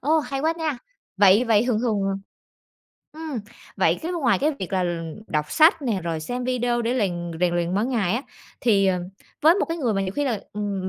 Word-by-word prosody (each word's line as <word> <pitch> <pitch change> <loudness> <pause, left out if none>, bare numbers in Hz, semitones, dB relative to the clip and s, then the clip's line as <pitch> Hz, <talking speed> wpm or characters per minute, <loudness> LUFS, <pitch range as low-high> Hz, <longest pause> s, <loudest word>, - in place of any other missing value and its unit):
Ô, 310 +4 +3
hay 275 -2 -3
quá 320 +2 +2
nha. 310 -6 -2 0.4
Vậy 205 +4 +6
vậy 225 -1 +3
thường 225 -3 +1
thường 220 -4 0
à 195 - 0 1.0
ừm, 315 -6 -4 0.4
vậy, - - +2
cái, 345 +3 -3
ngoài 275 -9 +2
cái 300 +3 +1
việc 190 0 -6
là, 185 - +1
ừm, 165 -2 -3
đọc 150 0 -2
sách 315 0 +5
nè 225 -7 -1
rồi 165 -2 -3
xem 245 +9 -4
video 245 -1 0
để 235 +2 0
lèn 175 -7 -1
rèn 175 -1 +2
luyện 175 +1 0
mỗi 210 +3 +1
ngày 220 -7 0
á, 255 - -2 0.4
thì, 200 -5 +3
ờ, 185 -1 +2 0.4
với 325 +3 +7
một 405 - +1
cái 330 0 -4
người 240 -7 0
mà 195 - 0
nhiều 185 - -2
khi 290 - 0
là, 225 -7 -1
ừm, 200 -2 -3
225 Hz, 225 wpm, -24 LUFS, 190-270 Hz, 1.0 s, với